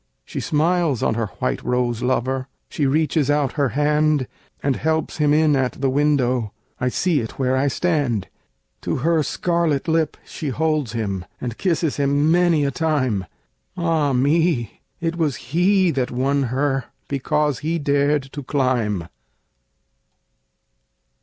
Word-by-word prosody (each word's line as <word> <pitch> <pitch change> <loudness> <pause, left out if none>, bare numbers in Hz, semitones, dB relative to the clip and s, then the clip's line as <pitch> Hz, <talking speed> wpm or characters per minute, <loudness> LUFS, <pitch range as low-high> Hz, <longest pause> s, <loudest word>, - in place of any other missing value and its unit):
She - - -5
smiles 160 -4 +1
on - - +2
her 115 -1 -1
white 65 - -1
rose 125 -2 0
lover, 130 +1 0 0.2
She 145 - 0
reaches 150 0 +1
out 145 -2 +2
her 140 -3 0
hand 150 -1 +2 0.4
And 140 -2 +1
helps 160 0 -1
him 150 -2 +2
in 155 -1 +4
at 130 -2 0
the 135 -1 -1
window 130 -6 +1 0.3
I 125 - +1
see 170 +3 +1
it 115 -3 -6
where 130 -1 +1
I 135 +2 +2
stand! 140 - 0 0.5
To - - -2
her 165 -1 +3
scarlet 170 -2 0
lip 160 -1 +1
she 155 - -5
holds 150 -4 0
him, 100 -5 -2 0.2
And 120 -2 -4
kisses 165 -3 0
him 145 +2 +2
many 170 -4 +3
a 140 - 0
time 130 - 0 0.5
Ah, 165 -4 +1
me! 140 - +1 0.2
it 165 0 -2
was 155 -6 +1 0.2
he 185 +1 +4
that 130 -4 -1
won 135 +2 0
her 135 0 0 0.2
Because 145 0 0
he 160 +3 -1
dared 145 -1 +1
to 145 - -5
climb! 125 - 0
145 Hz, 145 wpm, -21 LUFS, 130-160 Hz, 0.5 s, in